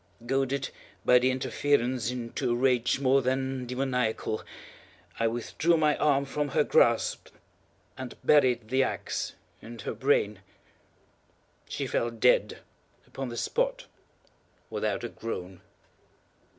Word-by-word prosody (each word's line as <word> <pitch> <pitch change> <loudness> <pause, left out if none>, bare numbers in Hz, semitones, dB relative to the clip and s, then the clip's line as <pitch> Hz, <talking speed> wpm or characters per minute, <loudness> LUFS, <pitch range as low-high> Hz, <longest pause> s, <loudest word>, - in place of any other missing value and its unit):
Goaded, 135 +1 0 0.3
by 125 - +7
the 130 +1 +2
interference, 130 -2 0
into 120 -1 -3
a - - +1
rage 125 0 +2
more 135 0 +4
than 130 0 -1
demoniacal, 125 -4 -1 0.8
I 115 - +3
withdrew 120 +8 +1
my 150 -1 +3
arm 140 -2 +2
from 145 +2 -2
her - - +2
grasp - - +2 0.7
and 130 -1 -6
buried 125 -6 +4
the 130 +2 +3
axe 130 - -2 0.3
in 115 +1 -10
her 105 - -4
brain. 105 -7 +1 1.3
She - - -3
fell 120 - 0
dead 115 +2 +2 0.4
upon 135 -2 -6
the 120 - -6
spot, - - -1 0.9
without - - -2
a - - -3
groan. 95 -5 -6
130 Hz, 120 wpm, -28 LUFS, 120-135 Hz, 1.3 s, by